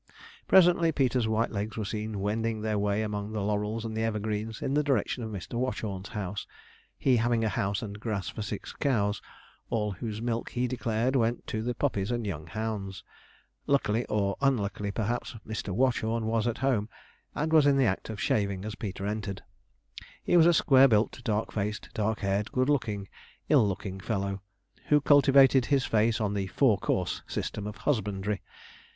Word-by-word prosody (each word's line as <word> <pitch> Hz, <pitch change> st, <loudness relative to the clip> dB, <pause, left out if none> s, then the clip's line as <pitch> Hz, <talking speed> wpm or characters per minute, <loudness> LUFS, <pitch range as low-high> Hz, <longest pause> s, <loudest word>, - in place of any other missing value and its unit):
Presently 175 Hz, -3 st, +5 dB
Peter's 130 Hz, -5 st, +1 dB
white 110 Hz, +1 st, +1 dB
legs 105 Hz, +1 st, -4 dB
were 110 Hz, -, -2 dB
seen 105 Hz, -1 st, -4 dB
wending 110 Hz, +2 st, -1 dB
their 110 Hz, -1 st, 0 dB
way 105 Hz, +1 st, +1 dB
among 105 Hz, 0 st, -4 dB
the 105 Hz, -, -2 dB
laurels 105 Hz, +2 st, -1 dB
and 110 Hz, -1 st, -4 dB
evergreens, 110 Hz, 0 st, -2 dB
in 135 Hz, -, -2 dB
the 150 Hz, -, +3 dB
direction 135 Hz, -4 st, 0 dB
of 110 Hz, -, -4 dB
Mr. 105 Hz, +3 st, -5 dB
Watchorn's 105 Hz, -6 st, -3 dB
house; 100 Hz, -1 st, -4 dB, 0.5 s
he 130 Hz, -3 st, +3 dB
having 115 Hz, 0 st, +1 dB
a 110 Hz, -, +2 dB
house 100 Hz, +2 st, -1 dB
and 105 Hz, -1 st, -6 dB
grass 105 Hz, -4 st, -3 dB
for -, -, -5 dB
six 105 Hz, -, -5 dB
cows, 105 Hz, -8 st, 0 dB, 0.5 s
all 105 Hz, -2 st, 0 dB
whose 105 Hz, +2 st, -5 dB
milk, 115 Hz, 0 st, -2 dB
he 125 Hz, 0 st, -1 dB
declared, 120 Hz, +1 st, -1 dB
went 120 Hz, -1 st, +1 dB
to 110 Hz, -, -3 dB
the 120 Hz, +2 st, -2 dB
puppies 105 Hz, -8 st, -1 dB
and 120 Hz, -2 st, -1 dB
young 80 Hz, -6 st, -4 dB
hounds. 105 Hz, -1 st, -4 dB, 0.6 s
Luckily, 120 Hz, -5 st, +2 dB
or 100 Hz, -2 st, 0 dB
unluckily 105 Hz, -6 st, 0 dB
perhaps, 115 Hz, +4 st, -2 dB
Mr. 110 Hz, -1 st, -4 dB
Watchorn 115 Hz, +1 st, +1 dB
was 115 Hz, 0 st, +1 dB
at 120 Hz, 0 st, -1 dB
home, 120 Hz, -4 st, 0 dB, 0.5 s
and 160 Hz, +2 st, -1 dB
was 155 Hz, -2 st, +6 dB
in 140 Hz, -1 st, +4 dB
the 135 Hz, -, +4 dB
act 95 Hz, -1 st, -1 dB
of 110 Hz, -2 st, -5 dB
shaving 100 Hz, -2 st, 0 dB
as 110 Hz, -, -4 dB
Peter 100 Hz, -3 st, -5 dB
entered. 105 Hz, -2 st, -3 dB, 0.8 s
He -, -, +2 dB
was 170 Hz, -1 st, +7 dB
a 175 Hz, -, +6 dB
square 135 Hz, -2 st, +6 dB
built 110 Hz, +1 st, +1 dB
dark 110 Hz, -1 st, -1 dB
faced, 105 Hz, 0 st, -3 dB
dark 110 Hz, 0 st, -1 dB
haired, 100 Hz, +2 st, 0 dB
good 130 Hz, +2 st, +1 dB
looking, 105 Hz, -8 st, 0 dB, 0.4 s
ill 105 Hz, -, +5 dB
looking 95 Hz, 0 st, -4 dB
fellow 100 Hz, -1 st, -2 dB, 0.5 s
who 150 Hz, -, +5 dB
cultivated 135 Hz, -3 st, +5 dB
his 140 Hz, -2 st, +2 dB
face 115 Hz, +1 st, +2 dB
on 105 Hz, -2 st, 0 dB
the 100 Hz, -2 st, -1 dB
four 110 Hz, 0 st, +3 dB
course -, -, -1 dB
system 105 Hz, 0 st, -4 dB
of 105 Hz, -, -7 dB
husbandry. 105 Hz, -6 st, -1 dB
110 Hz, 180 wpm, -28 LUFS, 105-120 Hz, 0.8 s, was